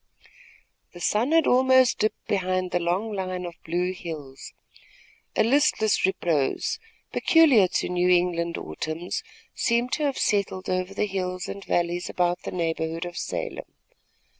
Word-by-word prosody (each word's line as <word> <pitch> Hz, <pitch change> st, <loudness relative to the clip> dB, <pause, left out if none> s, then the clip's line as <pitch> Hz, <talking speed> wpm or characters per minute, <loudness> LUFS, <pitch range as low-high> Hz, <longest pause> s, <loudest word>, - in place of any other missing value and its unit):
The 175 Hz, -, -11 dB
sun 220 Hz, -, +1 dB
had 325 Hz, -2 st, +4 dB
almost 260 Hz, 0 st, +4 dB
dipped 215 Hz, -, -1 dB
behind 185 Hz, -2 st, -1 dB
the 175 Hz, -, +1 dB
long 185 Hz, +6 st, -1 dB
line 185 Hz, -2 st, -3 dB
of 175 Hz, -, -6 dB
blue 180 Hz, +2 st, -1 dB
hills. 150 Hz, -7 st, -8 dB, 0.8 s
A -, -, +4 dB
listless 230 Hz, -5 st, +3 dB
repose, 175 Hz, -, 0 dB, 0.3 s
peculiar 285 Hz, -, +5 dB
to -, -, -1 dB
New 180 Hz, 0 st, +1 dB
England 175 Hz, -1 st, +2 dB
autumns, 155 Hz, -, -4 dB, 0.3 s
seemed 235 Hz, +1 st, +1 dB
to 305 Hz, -, -1 dB
have 280 Hz, -2 st, -1 dB
settled 195 Hz, -3 st, 0 dB
over 185 Hz, +1 st, -2 dB
the 210 Hz, -, +1 dB
hills 185 Hz, -2 st, -3 dB
and 200 Hz, -, -6 dB
valleys 175 Hz, 0 st, -1 dB
about 175 Hz, 0 st, 0 dB
the -, -, -6 dB
neighborhood 165 Hz, -1 st, -2 dB
of 175 Hz, 0 st, -7 dB
Salem. -, -, -5 dB
185 Hz, 140 wpm, -25 LUFS, 175-215 Hz, 0.8 s, peculiar